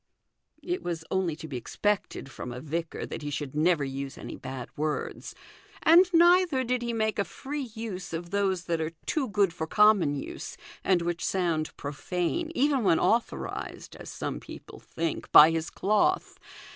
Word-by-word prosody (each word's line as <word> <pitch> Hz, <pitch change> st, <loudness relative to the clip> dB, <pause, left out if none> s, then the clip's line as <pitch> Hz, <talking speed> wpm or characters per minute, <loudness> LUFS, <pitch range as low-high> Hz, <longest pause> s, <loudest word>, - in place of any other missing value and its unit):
" -, -, -40 dB
It 365 Hz, -, -3 dB
was 165 Hz, -2 st, -4 dB
only 185 Hz, -4 st, 0 dB
to 160 Hz, -, -9 dB
be 135 Hz, -4 st, -5 dB
expected 190 Hz, -, -2 dB
from 125 Hz, -, -7 dB
a 125 Hz, -, -6 dB
vicar 160 Hz, +4 st, -4 dB
that -, -, -6 dB
he 145 Hz, -, -4 dB
should 145 Hz, -1 st, -4 dB
never 160 Hz, 0 st, +3 dB
use 135 Hz, 0 st, -5 dB
any -, -, -7 dB
bad 130 Hz, -2 st, -8 dB
words: 150 Hz, 0 st, -3 dB, 0.5 s
and 355 Hz, +3 st, +7 dB
neither 345 Hz, -4 st, +5 dB
did 250 Hz, 0 st, 0 dB
he 235 Hz, 0 st, -2 dB
make 220 Hz, -2 st, 0 dB
a -, -, +3 dB
free 275 Hz, +3 st, -6 dB
use 205 Hz, -5 st, -5 dB
of 170 Hz, +1 st, -5 dB
those 195 Hz, -3 st, 0 dB
that 165 Hz, -1 st, -1 dB
are 160 Hz, +1 st, -3 dB
too 275 Hz, -6 st, -1 dB
good 200 Hz, -4 st, +2 dB
for 160 Hz, -1 st, -4 dB
common 210 Hz, -7 st, +4 dB
use, 140 Hz, -, -6 dB, 0.3 s
and 180 Hz, -3 st, +2 dB
which 170 Hz, 0 st, -2 dB
sound 170 Hz, -4 st, -1 dB
profane, 180 Hz, -, -2 dB
even 275 Hz, -2 st, +2 dB
when 165 Hz, -5 st, +4 dB
authorized, 230 Hz, +1 st, -1 dB
as -, -, -10 dB
some -, -, -4 dB
people -, -, -11 dB
think, 165 Hz, -2 st, -4 dB
by 155 Hz, +2 st, +10 dB
his 165 Hz, 0 st, -2 dB
cloth. 215 Hz, -, +1 dB
175 Hz, 175 wpm, -28 LUFS, 155-230 Hz, 0.5 s, by